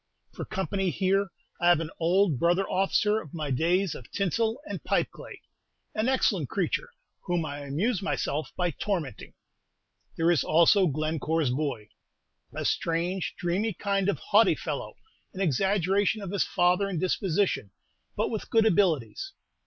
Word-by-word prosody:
For - - -6
company 190 0 -1
here 195 +2 +1 0.3
I 175 - +5
have 175 -3 +5
an 165 -1 -4
old 175 -3 +2
brother 175 +3 +2
officer 210 +3 +1
of 155 0 -11
my 150 -3 -3
days 175 +6 +1
of 120 - -11
tinsel 220 - 0
and - - -6
pipe - - 0
clay, - - -11 0.5
an 215 +4 0
excellent 265 - +1
creature, - - -1 0.4
whom 175 -3 0
I 145 -1 -5
amuse 170 - -1
myself 155 -6 -2
by 175 -1 +1
tormenting. 160 - -4 0.8
There 165 +1 +3
is 160 -8 +2
also 170 +4 +5
Glencore's 155 -1 0
boy, 130 -6 -3 0.6
a - - -5
strange, 170 +3 -1
dreamy 195 +5 -1
kind 195 +1 0
of - - 0
haughty 415 - +4
fellow, - - -5 0.4
an - - -6
exaggeration 195 - +1
of 190 - -5
his 200 - +1
father 180 +3 +2
in 185 - -3
disposition, 185 - 0 0.5
but - - 0
with 220 - -4
good 225 -1 +4
abilities. 190 - +1
180 Hz, 150 wpm, -27 LUFS, 160-200 Hz, 0.8 s, I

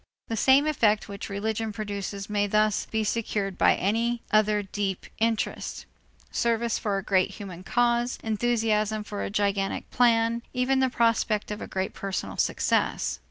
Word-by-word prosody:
The 225 - -1
same 265 +6 +5
effect 225 -9 +2
which 200 -1 -7
religion 220 +2 -2
produces 200 -1 -5
may 205 -1 0
thus 215 0 +2
be 220 0 -1
secured 210 -3 -1
by - - +4
any 230 +4 0
other 210 -1 +3
deep 195 -1 -3
interest: 225 0 -1 0.5
service 235 -1 0
for 205 -2 -1
a 195 - -3
great 185 -1 +1
human 185 -3 -8
cause, 240 +3 +1
enthusiasm 220 -1 +1
for 210 -1 -5
a - - -3
gigantic 200 -1 -1
plan, 230 -1 +3
even 255 +1 +2
the 260 0 +3
prospect 230 -3 +1
of 210 - -5
a - - -5
great 190 0 -3
personal 195 -1 -4
success. - - 0
215 Hz, 155 wpm, -26 LUFS, 200-230 Hz, 0.5 s, same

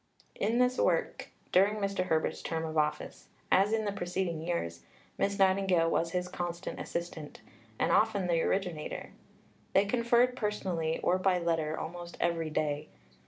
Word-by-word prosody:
In 225 +4 0
this 250 0 +2
work, - - 0 0.2
during 195 +3 +4
Mr. 200 -3 -1
Herbert's 160 -2 0
term 165 -1 -2
of 160 0 -5
office, 150 -1 -1 0.2
as 195 +3 +5
in 220 -1 +1
the 205 - 0
preceding 175 -3 -2
years, 85 - -3 0.4
Miss 200 0 +1
Nightingale 190 -4 +3
was 165 - +1
his 180 +1 -2
constant 175 0 -5
assistant, 170 -3 -5 0.4
and - - +1
often 215 -3 +3
the 170 -2 +2
originator. 180 -6 -2 0.6
They 195 - +5
conferred 240 +3 +3
personally 185 -8 -1
or 185 +1 +3
by 185 -1 +3
letter 165 -3 0
almost 175 +1 -7
every 165 -2 0
day. 150 0 -1
180 Hz, 150 wpm, -31 LUFS, 165-200 Hz, 0.6 s, as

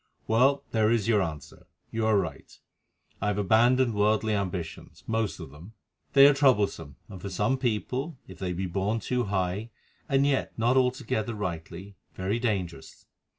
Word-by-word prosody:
Well, 135 +5 +3
there 110 -1 +2
is 115 -3 +1
your 110 -3 +3
answer. 80 -6 -6 0.2
You 110 -1 0
are 110 -2 +4
right, 80 -8 -4 0.6
I 105 - 0
have 105 -1 0
abandoned 120 +4 +3
worldly 105 +1 +2
ambitions—most 100 +3 -3
of - - -9
them. 85 +9 -13 0.4
They 140 0 +8
are 145 - +7
troublesome, 105 - +1
and 95 -3 -10
for 100 - -5
some 105 +7 +1
people, 130 +5 -2
if - - -12
they 95 -2 -2
be 90 +2 -3
born 100 +5 -1
too 125 +1 -1
high 100 +2 -2 0.4
and 135 0 +3
yet 140 -2 0
not 120 +3 +2
altogether 125 -4 0
rightly, 95 0 -6 0.2
very 100 +5 -1
dangerous. 95 - -3
105 Hz, 155 wpm, -27 LUFS, 95-120 Hz, 0.6 s, They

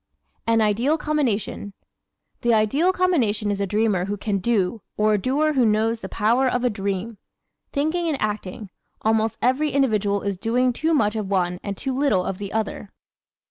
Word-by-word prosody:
An 225 -1 +3
Ideal 230 +9 +2
Combination 245 -10 -2 0.6
¶ - - -48
The 235 -1 +3
ideal 275 - +2
combination 245 - +1
is 200 0 -2
a 200 - 0
dreamer 210 -3 +1
who 205 +1 -3
can 200 0 -1
DO 210 0 0 0.2
or 215 0 +3
a - - +3
doer 290 +8 +1
who 260 -3 +3
knows 220 +1 +1
the - - -6
power 235 +5 +2
of 250 -1 0
a 250 - +2
DREAM. 200 +1 -3 0.5
Thinking 315 +4 0
and 300 -4 -1
acting 210 -1 -4 0.3
almost 220 0 +1
every 260 +5 +2
individual 215 -8 +1
is 200 -2 -2
doing 245 +5 +1
too 320 +6 +1
much 210 -6 +2
of 210 -3 -3
one 180 -2 0
and 200 -1 -5
too 265 -2 -3
little 260 -10 +2
of 190 - -4
the 200 -1 -5
other! 215 -2 -3
220 Hz, 180 wpm, -23 LUFS, 205-260 Hz, 0.6 s, An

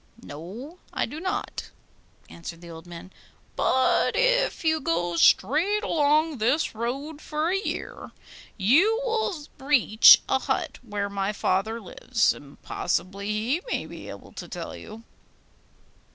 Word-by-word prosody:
'No, 215 - -9
I - - 0
do 300 - -7
not,' 370 +2 -4 0.6
answered 170 0 -9
the 170 -1 -10
old 165 +1 -11
man. 175 +2 -10 0.4
'But 260 0 +2
if - - +2
you 315 0 +3
go 170 +1 -1
straight 325 - +3
along 305 - +2
this 255 +8 +1
road 275 +7 -4
for 305 +2 -2
a 390 - +1
year, - - -5 0.5
you 325 - +4
will 450 -5 0 0.2
reach 260 -6 +7
a 265 - +2
hut - - -2
where 205 -4 -3
my 200 0 -2
father 210 +2 -1
lives, 230 +3 0
and 145 -1 -14
possibly 195 +2 -2
he 230 +10 0
may - - -1
be - - -10
able - - -10
to - - -8
tell - - -6
you. 220 +1 -11
240 Hz, 135 wpm, -26 LUFS, 195-315 Hz, 0.6 s, reach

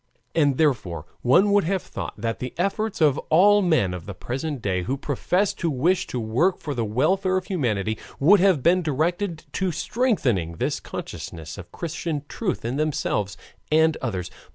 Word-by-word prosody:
And, 145 -5 +3
therefore, 95 - 0 0.2
one 180 +12 +4
would 205 -1 +4
have 190 +1 0
thought - - -6
that 115 0 -3
the 125 - -5
efforts 200 +2 -1
of 145 -3 +4
all 205 +6 +6
men 155 - +2
of 90 -1 -7
the 100 - -6
present 135 - -4
day 95 -4 -1
who 130 +9 -2
profess 180 +8 0
to 170 - -2
wish 170 +7 +1
to 125 - -3
work 120 +12 +1
for 145 - -5
the 120 -3 -1
welfare 185 - +1
of 185 - -3
humanity 110 - -1 0.2
would 190 +9 +6
have 180 -8 +3
been 180 +2 +4
directed 165 +3 -1
to 190 -2 -1
strengthening 155 - 0
this 80 - -2
consciousness 80 0 -7
of 95 -3 -10
Christian 160 -2 -4
truth 190 - -3
in 120 +4 -2
themselves 105 - -1 0.3
and 160 0 +4
others. 95 -8 -3
155 Hz, 175 wpm, -24 LUFS, 115-180 Hz, 0.3 s, all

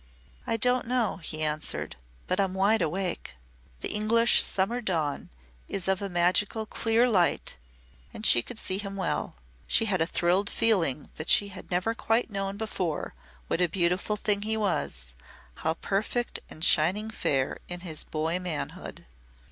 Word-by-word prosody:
"I 225 - +1
don't 250 +1 +3
know," 245 -3 0
he 155 -3 -4
answered, 155 0 -2 0.3
"but 185 - -1
I'm 190 -1 0
wide 205 +3 +3
awake." 180 - -2 0.5
The - - -2
English 230 +3 +4
summer 215 +6 0
dawn 160 -9 -2 0.4
is 190 -2 -3
of 190 0 +1
a 200 - -3
magical 185 +5 +1
clear 225 +3 +2
light 185 -8 +1 0.6
and 215 - -7
she 120 - +7
could 230 - -10
see 190 -3 -1
him 195 -1 -5
well. 195 - -2 0.3
She 225 - +3
had 190 -5 0
a 165 - +2
thrilled 185 +4 +1
feeling 165 - +1
that 155 - -4
she 205 - +5
had 185 -1 -10
never 185 +5 0
quite 230 0 0
known 195 0 -3
before 185 -7 -3 0.3
what 165 - -1
a 175 - +3
beautiful 180 +4 +1
thing 205 -1 +1
he 220 +1 0
was 65 - -2 0.4
how 160 +1 -1
perfect 215 +7 -2
and 160 - -2
shining 190 +8 +3
fair 135 -10 -1
in 175 0 -6
his 160 -4 -3
boy 160 +3 -2
manhood. 175 -5 -5
190 Hz, 160 wpm, -27 LUFS, 170-215 Hz, 0.6 s, she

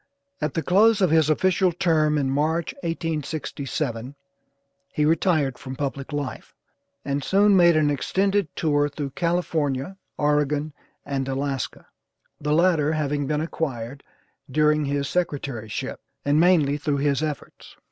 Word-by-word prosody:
At 150 - -2
the 165 - 0
close 215 +4 +4
of 185 -5 +3
his 160 -2 +4
official 185 +3 +2
term 155 -3 +2
in 140 -2 0
March, 160 - 0
1867, 145 -5 -3 0.8
he 150 - +1
retired 155 -4 +1
from 130 0 -7
public 140 +1 -4
life, 145 -2 -5 0.5
and 140 0 -1
soon 200 +4 +4
made 170 -2 +6
an 150 -1 +3
extended 195 +6 +1
tour 145 -2 +1
through 140 -1 -5
California, 165 -1 -1 0.2
Oregon 150 0 +1 0.3
and 135 -1 -2
Alaska; 135 -1 -3 0.5
the 150 - -2
latter 160 -2 +3
having 145 -2 -1
been 150 +1 0
acquired 140 -5 -4 0.5
during 150 +2 +2
his 140 0 -1
secretaryship, 135 - -3 0.3
and 145 +2 +3
mainly 160 -5 +4
through 145 -1 -1
his 140 0 +1
efforts. 150 -2 -6
150 Hz, 130 wpm, -24 LUFS, 140-165 Hz, 0.8 s, made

